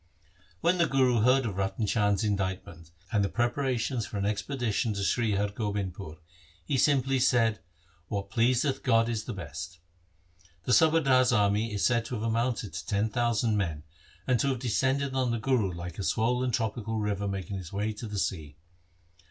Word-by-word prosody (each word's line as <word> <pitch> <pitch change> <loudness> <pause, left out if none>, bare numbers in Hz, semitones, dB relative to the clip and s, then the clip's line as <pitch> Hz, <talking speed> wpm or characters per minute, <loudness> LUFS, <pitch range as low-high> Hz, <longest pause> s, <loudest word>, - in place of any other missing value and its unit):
When 180 +1 +2
the 170 - +4
Guru 130 -3 +3
heard 130 +3 +4
of 100 -4 -4
Ratan 95 +3 -1
Chand's 105 -1 +1
indict 95 -3 -1
ment 85 -1 -13 0.2
and 105 -3 +2
the 100 - 0
preparations 120 0 -1
for 105 - -6
an 100 - -1
expedition 110 +1 -1
to 100 - -2
Sri 110 +1 +1
Har 100 +1 0
Gobindpur, 100 -5 -4 0.5
he 135 - -1
simply 135 -1 +2
said, 115 -4 +3 0.2
' 85 0 -35
What 100 0 -4
pleaseth 125 +4 +1
God 115 -3 +3
is 115 -2 -2
the 120 - -4
best.' 85 0 -7 0.9
The - - -2
subadar's 140 -6 +4
army 105 0 +2
is 100 -2 0
said 115 -2 +2
to 125 - -4
have 110 - -4
amounted 115 -3 -1
to 80 - -5
ten 105 +1 0
thousand 115 -2 +1
men, 80 -7 -2 0.4
and 125 -3 +2
to 140 - +1
have 135 -2 0
descended 130 +4 0
on 130 -2 +1
the 115 - 0
Guru 110 -4 +1
like 85 0 -7
a - - -2
swollen 125 +5 +1
tropical 115 -2 -2
river 100 -1 -1
making 100 0 -4
its 85 -3 -9
way 105 +2 -2
to 110 +2 -7
the 105 -1 -5
sea. 80 -7 -3
110 Hz, 185 wpm, -28 LUFS, 100-125 Hz, 0.9 s, the